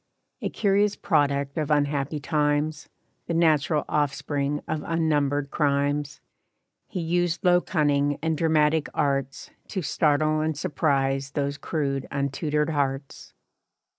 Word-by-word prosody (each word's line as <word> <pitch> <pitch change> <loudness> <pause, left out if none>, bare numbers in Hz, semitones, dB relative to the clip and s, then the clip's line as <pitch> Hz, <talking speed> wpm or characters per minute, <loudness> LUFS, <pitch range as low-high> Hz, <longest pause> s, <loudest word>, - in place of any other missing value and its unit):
A - - -1
curious 205 0 +2
product 140 -4 0
of 150 - -2
unhappy 145 0 0
times, 150 0 0 0.4
The 170 - -1
natural 155 -2 +2
offspring 145 0 -1
of 155 -1 -2
unnumbered 145 -4 0
crimes, 145 -1 0 0.7
He 185 - -5
used 175 +2 0
low 180 0 +5
cunning 145 -4 +1
and 160 0 0
dramatic 155 -1 +2
arts 135 -1 -1 0.2
To 190 -4 -4
startle 155 +1 +2
and 155 -1 -1
surprise 140 -4 0
those 140 0 -2
crude 140 -3 -2
untutored 150 +2 -1
hearts. 140 -2 -3
150 Hz, 115 wpm, -25 LUFS, 140-160 Hz, 0.7 s, low